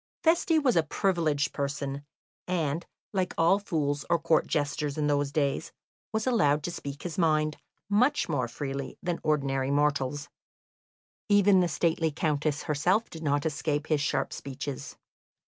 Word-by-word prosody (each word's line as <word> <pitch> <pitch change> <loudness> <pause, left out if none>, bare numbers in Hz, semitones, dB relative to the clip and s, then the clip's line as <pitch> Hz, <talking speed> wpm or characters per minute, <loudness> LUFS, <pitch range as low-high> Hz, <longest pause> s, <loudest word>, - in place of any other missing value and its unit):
Feste 325 -1 +3
was 255 -5 +3
a 165 - +5
privileged 155 -4 0
person, 140 0 -3 0.4
and, 165 -2 -1 0.3
like 185 -2 -1
all 170 +5 +4
fools 150 -7 -1
or 170 - +4
Court 160 -1 +2
jesters 145 -1 -1
in 150 - 0
those 145 -1 +1
days, 140 -2 -1 0.4
was 220 0 -1
allowed 150 - +3
to 175 - -2
speak 145 -3 -7
his 175 0 -4
mind 155 -2 +2 0.3
much 250 +9 +2
more 145 -6 0
freely 135 +2 -5
than 175 -1 -1
ordinary 135 -3 0
mortals; 145 0 +1 1.0
even 205 -1 +5
the 180 - +3
stately 160 +1 +1
Countess 150 -1 -1
herself 180 +9 +1
did 160 - -8
not 145 -1 0
escape 150 -1 -1
his 155 -3 +1
sharp 135 -2 -1
speeches. 135 0 -6
150 Hz, 145 wpm, -28 LUFS, 145-175 Hz, 1.0 s, a